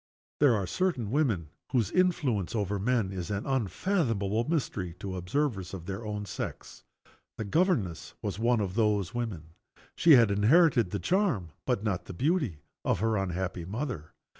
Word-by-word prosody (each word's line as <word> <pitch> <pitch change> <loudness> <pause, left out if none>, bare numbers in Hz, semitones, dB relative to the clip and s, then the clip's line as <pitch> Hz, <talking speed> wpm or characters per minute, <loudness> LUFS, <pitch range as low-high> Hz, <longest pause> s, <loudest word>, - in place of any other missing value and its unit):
There 140 -5 +5
are 100 -3 -1
certain 120 - -1
women 115 - +1 0.2
whose 120 -6 +2
influence 140 - +1
over 100 -2 -1
men 110 -2 +1
is 90 -4 -5
an 100 0 -2
unfathomable 115 - 0
mystery 105 - -2
to 95 0 -5
observers 95 - -1
of 85 -3 -8
their 95 +4 -5
own 105 -1 -4
sex. - - -6 0.5
The 110 - -2
governess 130 - 0
was - - -4
one 115 0 +2
of 95 -2 -2
those 105 -2 +1
women. 95 -10 -4 0.4
She 165 - +6
had 115 -6 +6
inherited 120 - +4
the 100 - -2
charm, 160 - +1 0.2
but 100 - +1
not 100 -5 -1
the - - -7
beauty, 135 - 0 0.2
of - - +1
her 110 +1 +1
unhappy 95 -2 -2
mother. 105 - -4
105 Hz, 160 wpm, -29 LUFS, 95-130 Hz, 0.5 s, She